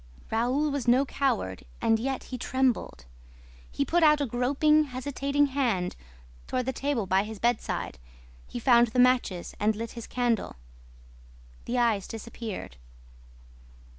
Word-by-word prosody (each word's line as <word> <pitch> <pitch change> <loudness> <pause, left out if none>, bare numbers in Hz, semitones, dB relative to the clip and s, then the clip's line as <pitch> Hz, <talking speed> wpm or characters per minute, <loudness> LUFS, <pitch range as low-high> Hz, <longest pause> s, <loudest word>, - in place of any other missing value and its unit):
Raoul 255 +7 +1
was 280 -4 -3
no 255 +3 +5
coward; 245 - -1 0.2
and 225 0 +2
yet 265 +3 -2
he 255 - -6
trembled. 255 - -1 0.7
He 280 - -1
put 345 +3 +2
out 300 -2 +6
a 285 - +1
groping, 285 +6 +2
hesitating 280 +2 0
hand 225 -10 0 0.5
toward 255 -1 -1
the 265 - -1
table 275 -7 -1
by 190 +1 +3
his 215 0 -7
bedside. 235 +2 -1 0.5
He - - -7
found 240 0 +5
the 235 +3 -2
matches 245 -8 +2
and 215 +1 +2
lit 230 +1 -5
his 235 -2 -8
candle. 240 -3 -1 1.1
The 245 - -2
eyes 230 -5 +2
disappeared. 225 - -7
245 Hz, 135 wpm, -27 LUFS, 225-275 Hz, 1.1 s, out